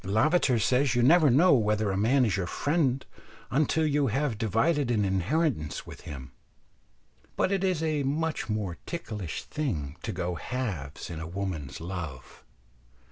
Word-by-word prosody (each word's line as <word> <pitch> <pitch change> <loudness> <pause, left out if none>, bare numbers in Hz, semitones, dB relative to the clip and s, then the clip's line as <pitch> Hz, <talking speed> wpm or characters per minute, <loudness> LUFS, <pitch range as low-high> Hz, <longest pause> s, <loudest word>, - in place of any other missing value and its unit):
Lavater 125 - +3
says 125 +3 +2
you 120 - +3
never 155 +3 +6
know 155 +8 +5
whether 105 -4 +2
a - - -1
man 125 +7 +3
is 105 - +1
your 95 -3 -2
friend 140 - 0 0.5
until 155 +4 +2
you 145 -2 +2
have 135 +2 0
divided 120 - +1
an 105 -4 +2
inheritance 95 - 0
with - - -10
him; 65 -2 -8 1.0
but 190 - +1
it 195 -1 0
is 180 -4 +1
a 155 -2 0
much 150 0 -1
more 105 -5 -2
ticklish 105 - -5
thing 80 - -3
to - - -3
go 90 +1 -2
halves 90 - -4
in 80 - -5
a 80 - -5
woman's 85 -6 -4
love. 80 -7 -7
115 Hz, 155 wpm, -28 LUFS, 95-145 Hz, 1.0 s, never